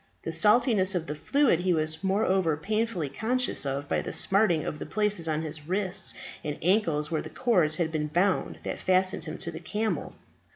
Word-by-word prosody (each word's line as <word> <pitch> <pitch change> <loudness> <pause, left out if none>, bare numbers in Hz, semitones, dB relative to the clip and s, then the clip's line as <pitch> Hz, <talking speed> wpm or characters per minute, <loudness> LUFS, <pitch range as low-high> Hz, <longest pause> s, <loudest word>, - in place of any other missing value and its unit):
The 165 - -3
saltness 210 - +4
of 170 -2 -1
the 150 - -4
fluid 240 - +2
he 180 -1 +1
was 155 +1 -1
moreover 190 -5 +1
painfully 215 -2 -2
conscious 225 - 0
of 140 +1 -3
by - - 0
the - - -6
smarting 190 -6 +2
of 150 - -4
the - - -5
places 210 -6 +1
on 155 0 -1
his 155 -1 -6
wrists 190 +1 0 0.3
and 150 -1 -4
ankles 165 -5 +1
where 160 - 0
the - - -8
cords 180 -12 +2
had 160 -1 -1
been 155 -1 -2
bound 180 +5 0
that - - -4
fastened 185 -2 +1
him 155 - -6
to 170 - -2
the - - -8
camel. 215 +1 -3
180 Hz, 195 wpm, -27 LUFS, 155-210 Hz, 0.3 s, saltness